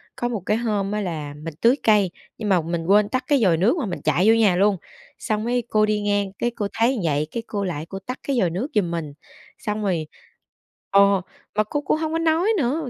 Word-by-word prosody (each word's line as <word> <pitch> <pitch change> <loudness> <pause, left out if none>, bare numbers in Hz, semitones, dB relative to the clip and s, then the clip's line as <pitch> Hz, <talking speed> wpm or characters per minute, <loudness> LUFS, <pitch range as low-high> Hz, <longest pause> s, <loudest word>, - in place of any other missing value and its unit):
có 240 - -2
một 235 -4 -2
cái 210 - +1
hôm 210 -4 -1
á 210 0 -1
là 155 -6 -4
mình 165 -1 -5
tưới 235 +3 +5
cây, 205 -4 +4 0.3
nhưng 215 -2 -3
mà 185 -3 +4
mình 165 0 -3
quên 205 +2 +4
tắt 255 +3 -1
cái 280 -5 +3
vòi 175 -5 +4
nước 220 - +2
mà 275 - -1
mình 180 - -5
chạy 185 +5 +2
vô 225 - +7
nhà 210 -5 +4
luôn, 200 +1 +3 0.4
xong 215 0 -2
mới 245 +1 0
cô 215 0 +3
đi 210 0 0
ngang 205 -1 0
cái 240 - 0
cô 205 - -2
thấy 240 +3 +2
vậy, 150 -1 0
cái 230 - -4
cô 200 -2 -3
lại 160 -4 -3
cô 195 - -6
tắt 250 +7 -7
cái 270 -3 +1
vòi 180 -5 +2
nước 190 +11 -3
giùm 180 -5 +1
mình, 155 -4 -4 0.4
xong 210 0 -3
rồi 170 -6 -1 0.8
ồ, 200 -1 +5 0.3
mà 215 - +3
cô 290 +7 -3
cũng 290 - 0
hông 315 0 -2
có - - +1
nói 330 +5 +2
nữa, 285 0 -1
210 Hz, 240 wpm, -23 LUFS, 185-240 Hz, 0.8 s, vô